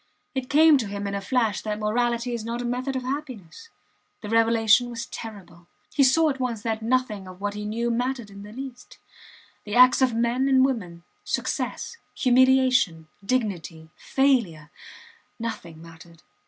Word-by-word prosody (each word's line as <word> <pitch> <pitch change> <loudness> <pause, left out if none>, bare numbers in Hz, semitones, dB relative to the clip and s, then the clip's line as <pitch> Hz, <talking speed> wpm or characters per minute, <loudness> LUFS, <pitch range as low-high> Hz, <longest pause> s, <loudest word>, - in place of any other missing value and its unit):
It 260 -1 -4
came 305 0 +6
to 225 - -3
him 200 0 -5
in 200 - -3
a 200 - -2
flash 225 0 0
that 210 -1 -3
morality 235 +3 0
is 235 -2 -4
not 230 +1 -4
a 245 - -4
method 255 +3 -2
of 260 - -2
happiness. 265 - -6 0.5
The 210 - -7
revelation 230 +1 +4
was 235 0 -5
terrible. 185 -6 -10 0.3
He 280 - +4
saw 305 +4 +4
at 270 - -7
once 235 -5 -3
that 225 -1 -2
nothing 225 -4 -1
of 185 0 -11
what 205 0 -3
he 210 0 -6
knew 230 +3 -1
mattered 245 -2 -2
in 200 0 -11
the 205 +1 -10
least. 260 +1 -9 0.7
The 210 - -5
acts 255 +1 +6
of 255 -3 +3
men 240 +4 +1
and 260 -1 +5
women, 180 -10 -4 0.2
success, 470 - -3 0.2
humiliation, 255 - +3
dignity, 180 -9 -3
failure 225 - 0 0.7
nothing 190 -9 -6
mattered. 165 0 -15
230 Hz, 165 wpm, -25 LUFS, 205-255 Hz, 0.7 s, came